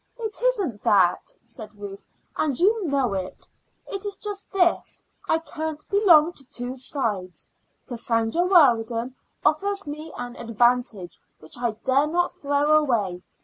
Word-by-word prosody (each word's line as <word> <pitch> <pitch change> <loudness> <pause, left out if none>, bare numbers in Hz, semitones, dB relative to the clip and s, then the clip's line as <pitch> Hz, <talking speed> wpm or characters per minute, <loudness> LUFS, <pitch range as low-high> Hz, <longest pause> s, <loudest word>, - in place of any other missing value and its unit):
"It 440 -3 -4
isn't 405 - 0
that," 185 -3 +2
said 215 -3 -10
Ruth, 200 -1 -9 0.3
"and 285 -5 0
you 410 +1 +2
know 270 -7 +1
it. 190 -1 -5 0.4
It 395 0 -5
is 405 -1 -1
just 410 -1 -5
this: 360 -3 +1 0.3
I 320 - +4
can't 315 -2 -6
belong 350 -5 +5
to 275 - -9
two 245 0 -5
sides. 220 - -3 0.4
Cassandra 230 +4 0
Weldon 240 -8 +3 0.3
offers 395 +5 +1
me 305 +2 -6
an 245 0 -6
advantage 235 -4 0 0.2
which 155 - -9
I 240 -2 -1
dare 275 +3 +3
not 350 +3 0
throw 285 +1 +1
away. 215 -12 0
275 Hz, 140 wpm, -24 LUFS, 230-340 Hz, 0.4 s, belong